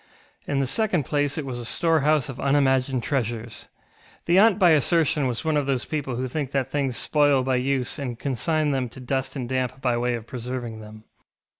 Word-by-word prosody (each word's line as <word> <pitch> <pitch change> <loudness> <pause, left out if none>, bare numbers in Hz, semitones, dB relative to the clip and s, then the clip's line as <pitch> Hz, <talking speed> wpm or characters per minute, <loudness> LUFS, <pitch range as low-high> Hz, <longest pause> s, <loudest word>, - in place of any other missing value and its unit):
In 140 - 0
the 135 - +1
second 180 - 0
place 145 +1 -1
it 155 - -3
was 125 -2 -5
a - - -6
storehouse 155 +1 +2
of 135 -1 -8
unimagined 135 -2 +2
treasures. 120 -4 -3 0.6
The 175 +2 +4
aunt 215 -1 +5
by 180 -5 +5
assertion 155 -1 +3
was 120 +4 -3
one 155 -1 +1
of 145 -2 0
those 130 -2 0
people 140 -5 -3
who 130 +2 -2
think 140 +1 -3
that 135 -2 -1
things 135 -4 -1
spoil 145 -3 +3
by 130 0 +1
use 130 0 -1
and 125 -4 -4
consign 150 +4 0
them 130 -3 -1
to 125 - -12
dust 130 +1 -3
and 130 -3 -4
damp 130 0 -2
by 125 -2 +1
way 120 0 0
of 115 -2 -7
preserving 120 -2 -5
them. 110 0 -12
135 Hz, 200 wpm, -24 LUFS, 125-145 Hz, 0.6 s, aunt